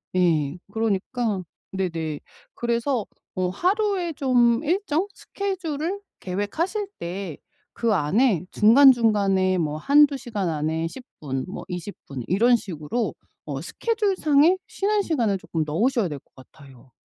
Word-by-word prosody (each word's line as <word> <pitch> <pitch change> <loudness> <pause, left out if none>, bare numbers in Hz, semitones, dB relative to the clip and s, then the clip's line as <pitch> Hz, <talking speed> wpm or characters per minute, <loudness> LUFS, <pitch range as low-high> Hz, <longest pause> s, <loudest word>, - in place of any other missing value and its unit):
예. 165 -4 +2
그러니까 220 -1 -1 0.3
네네. 165 -5 -3 0.3
그래서 235 0 0 0.3
어 185 -1 0
하루에 370 - 0
좀 245 -2 +3
일정 350 +1 0
스케줄을 370 -2 -3 0.2
계획하실 320 - -2
때 175 -2 -5 0.4
그 230 -2 +1
안에 190 - +2
중간 265 +6 +7
중간에 200 -6 +2
뭐 155 -3 -1
1-2 285 - +5
시간 220 -9 -3
안에 160 +1 -1
10 255 +7 -10 0.2
분 135 -3 -3
뭐 190 - -7
20 180 +2 -5
분 135 -2 -6
이런 235 +7 +4
식으로 185 +4 -3 0.3
어 - - -4
스케줄 435 -4 -1
상에 310 +4 +4
쉬는 415 +1 0
시간을 235 - +1
쪼끔 165 -3 -3
넣으셔야 215 - +1
될 145 -2 -5
것 - - -41
같아요. 130 -1 -17
220 Hz, 245 characters per minute, -24 LUFS, 175-285 Hz, 0.4 s, 중간